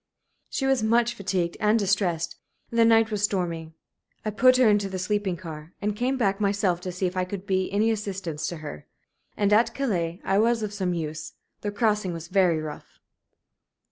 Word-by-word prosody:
She 270 - -2
was 270 -3 +2
much 235 +2 +3
fatigued 180 -3 -2
and 215 +1 +3
distressed, 190 -5 0 0.4
and 230 - 0
the 230 - +7
night 225 -1 +4
was 210 -2 -1
stormy. 170 -5 -1 0.5
I 215 - 0
put 255 +4 +5
her 255 -2 +5
into 205 -2 +3
the 190 - -4
sleeping 190 0 -1
car, 160 -2 -9
and 205 0 -1
came 255 +4 0
back 200 -4 +1
myself 200 -3 +1
to 180 - -4
see 185 +2 -2
if 180 0 -2
I 185 - +1
could 185 +1 -6
be 190 -2 0
any 215 +3 +2
assistance 195 -7 -3
to 175 - -4
her. 75 - -8 0.5
And 205 0 +2
at 230 +2 +3
Calais 180 -10 -1
I 195 +1 +2
was 230 0 +2
of 210 -1 -3
some 185 -4 -1
use. 155 -1 -5 0.3
The 205 - -2
crossing 210 -3 0
was 165 0 -7
very 180 -4 +3
rough." 155 -1 -8
200 Hz, 195 wpm, -26 LUFS, 175-215 Hz, 0.5 s, the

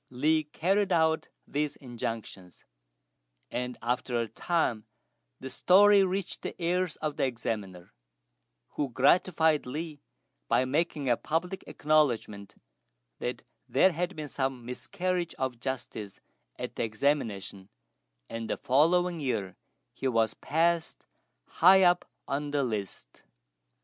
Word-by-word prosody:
Li 155 +5 +1
carried 190 +6 +1
out 160 -2 +2 0.2
these 150 0 -1
injunctions; 115 - -7 0.9
and 125 0 -3
after 120 0 0
a 115 - -1
time 115 -2 -1 0.5
the 130 - -7
story 200 +7 +6
reached 190 0 -2
the - - -6
ears 180 0 0
of 155 -2 -4
the - - +2
Examiner, 105 -7 -5 0.8
who 145 -2 -2
gratified 155 +3 +3
Li 150 +2 -5 0.5
by 130 - +3
making 145 +1 -1
a 120 - +4
public 175 +8 -2
acknowledgment 140 -9 0 0.6
that - - -4 0.3
there 190 - +5
had 180 +3 -2
been 155 -1 -5
some 130 -3 -3
miscarriage 180 +7 -3
of 130 -3 -3
justice 120 -6 -5 0.4
at - - -6
the - - 0
examination; 105 -5 -1 0.6
and 115 -1 -5
the - - -1
following 170 +6 +3
year 105 - -2 0.4
he 135 - -3
was 115 -3 +2
passed 165 +1 0 0.4
high 190 +3 +6
up 175 0 +3 0.2
on 145 +1 -2
the 145 -1 +1
list. 100 - -5
145 Hz, 120 wpm, -29 LUFS, 120-170 Hz, 0.9 s, story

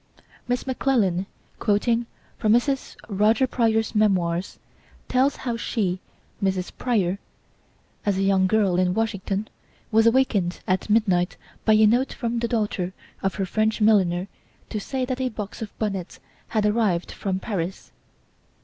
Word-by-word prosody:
Miss 245 0 -1
McClellan, 225 -9 +1 0.3
quoting 230 +2 +1 0.3
from 215 -1 +3
Mrs. 270 +3 +1
Roger 215 +5 +3
Pryor's 225 -3 +1
Memoirs, 185 -4 +1 0.5
tells 265 +2 +2
how 240 -3 -3
she, 195 -6 -1 0.4
Mrs. 190 -1 0
Pryor, 200 -7 0 0.8
as 200 -2 +1
a 195 - +1
young 195 -1 +3
girl 195 -3 +2
in 180 0 +2
Washington, 210 -2 -1 0.4
was 225 +1 +5
awakened 225 -8 +2
at 185 +3 0
midnight 195 -5 +2 0.3
by 220 - +5
a 215 0 +6
note 245 +5 +3
from 235 -1 -2
the 235 - 0
daughter 205 -6 -1 0.3
of 195 -1 -1
her 195 - -1
French 215 +4 0
milliner 190 -4 +3 0.4
to 215 - -2
say 260 +5 -2
that 255 0 -3
a 255 - +1
box 215 0 -7
of 220 - -7
bonnets 195 -5 -3 0.3
had 215 -2 0
arrived 210 -5 +1
from 190 -2 -2
Paris. 190 -3 -4
210 Hz, 140 wpm, -24 LUFS, 190-230 Hz, 0.8 s, a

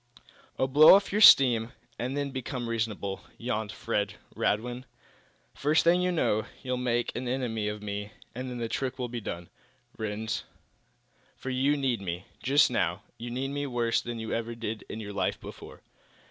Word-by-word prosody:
"Oh, - - +2
blow 150 +6 +9
off 200 0 +1
your 210 +2 +1
steam, 130 - +9
quietly, 120 -1 -19 0.2
and 130 +4 -2
then 140 -1 -2
become 130 -1 -4
reasonable," 110 -4 -2 0.2
yawned 110 -3 -2
Fred 100 -1 -2 0.2
Radwin. 120 +4 -1 0.7
"First 150 +2 +2
thing 175 +2 +4
you 180 0 +1
know, 110 -10 +1 0.2
you'll 130 -1 -1
really 125 - -4
make 120 -1 0
an 125 +1 -3
enemy 120 -4 -1
of 105 0 -4
me, 105 0 -4 0.2
and 125 +2 -5
then 125 - -5
the 115 -1 -2
trick 130 +2 -2
will 125 -2 -3
be 120 -1 -4
done, 85 -4 -6 0.5
Rhinds. 110 0 -3 0.9
For 130 - -5
you 135 +3 +2
need 130 -6 0
me. 90 -1 -4 0.2
Just 140 +2 +4
now, 95 -4 0 0.2
you 120 +1 -5
need 130 +3 -2
me 145 0 -2
worse 120 -3 +1
than 120 -1 -5
you 110 -1 -4
ever 115 0 -2
did 115 -2 -5
in 110 - -5
your 105 -2 -6
life 100 - -1
before." - - -11
120 Hz, 185 wpm, -28 LUFS, 110-130 Hz, 0.9 s, blow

